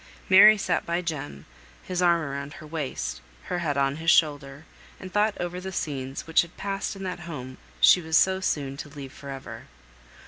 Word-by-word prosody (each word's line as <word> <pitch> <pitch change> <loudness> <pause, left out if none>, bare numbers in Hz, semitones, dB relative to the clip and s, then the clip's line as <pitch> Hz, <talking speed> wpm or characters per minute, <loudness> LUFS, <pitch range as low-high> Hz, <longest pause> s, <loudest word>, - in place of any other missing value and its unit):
Mary 210 +3 +9
sat - - 0
by 170 +1 -1
Jem, 145 - -5 0.4
his 180 -1 -3
arm 170 -3 +3
round 140 +1 -5
her 180 -4 -11
waist, 130 - -4 0.2
her 180 - -3
head 150 -5 -1
on 140 +1 +1
his 165 +1 -1
shoulder; 145 -3 +2 0.3
and 185 -1 -9
thought 210 0 +2
over 175 +1 -4
the 190 +1 -6
scenes 135 -6 -4
which 165 - +4
had 170 0 -10
passed 195 0 -3
in 195 - -8
that 180 -2 -4
home 130 -4 -7 0.2
she 180 - +7
was 160 -1 +2
so 190 0 +3
soon 140 -7 -2
to 145 +1 -7
leave 140 -2 -9
for 140 - -10
ever. 135 -1 -8
160 Hz, 195 wpm, -26 LUFS, 140-180 Hz, 0.4 s, Mary